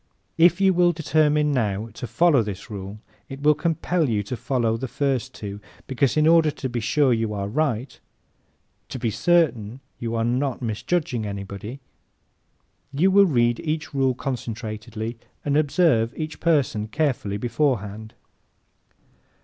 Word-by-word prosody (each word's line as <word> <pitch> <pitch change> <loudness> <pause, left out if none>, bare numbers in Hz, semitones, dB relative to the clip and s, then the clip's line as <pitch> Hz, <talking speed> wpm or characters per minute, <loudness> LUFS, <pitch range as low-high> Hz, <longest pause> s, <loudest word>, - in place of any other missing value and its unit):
If 175 +2 +5
you 195 -1 +4
will 175 0 +3
determine 150 -1 +2
now 110 -4 -1
to 120 - -6
follow 140 +4 +4
this 105 0 -6
rule 100 0 -6 0.3
it 135 +1 -8
will 150 +1 +6
compel 165 0 0
you 105 -3 0
to 115 +5 -5
follow 120 -3 0
the 130 +3 -4
first 130 -1 -1
two 100 -1 -7 0.3
because, 135 +1 0
in 155 - +4
order 165 -1 +5
to 145 -2 -4
be 120 -1 -3
sure 130 +4 +2
you 110 -2 -1
are 100 -1 -3
right, 130 0 -2 0.9
to - - -5
be 115 -3 -1
certain 125 -8 +1 0.2
you 115 -1 -3
are 115 - 0
not 125 +2 0
misjudging 120 +1 -2
anybody, 100 +5 -7 1.1
you 165 +8 +2
will 200 0 +6
read 120 -5 +2
each 155 -2 -3
rule 135 -2 +1
concentratedly 115 -2 -5 0.3
and 145 -1 +1
observe 145 -6 +2
each 155 -1 -5
person 140 -10 +1
carefully 120 -6 -1
beforehand. 110 -4 -2
130 Hz, 145 wpm, -23 LUFS, 110-150 Hz, 1.1 s, will